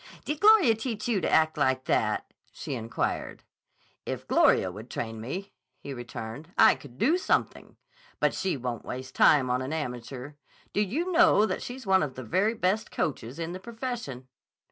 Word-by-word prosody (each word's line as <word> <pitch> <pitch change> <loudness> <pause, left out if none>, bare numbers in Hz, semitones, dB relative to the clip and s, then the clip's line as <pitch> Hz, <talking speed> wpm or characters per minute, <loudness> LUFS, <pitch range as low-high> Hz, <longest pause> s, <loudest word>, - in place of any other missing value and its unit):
"Did 300 0 -2
Gloria 415 - +7
teach 220 -1 -4
you 220 -6 +1
to - - 0
act 160 0 +3
like 130 0 +2
that?" - - +1 0.3
she - - -6
inquired. 115 -2 -3 0.6
"If - - -5
Gloria 95 - +4
would 105 +6 -10
train 115 -1 -5
me," 180 - -6 0.2
he 140 - -7
returned, 120 +5 -7
"I - - +7
could 125 -3 -13
do 315 - +3
something. - - -1 0.4
But - - +2
she 185 -4 -1
won't 120 -2 -4
waste 130 +1 -7
time 130 -4 +5
on 125 +1 +1
an 130 +2 -4
amateur. 130 -2 -5 0.4
Do 205 - +2
you 300 - -1
know 325 - +5
that - - -3
she's 255 0 -7
one 190 -1 +4
of 145 -4 -3
the 130 - -6
very 195 - +1
best 210 +2 0
coaches 130 -3 -3
in 165 0 -4
the 185 - -6
profession?" 225 - -6
160 Hz, 175 wpm, -28 LUFS, -, 0.6 s, Gloria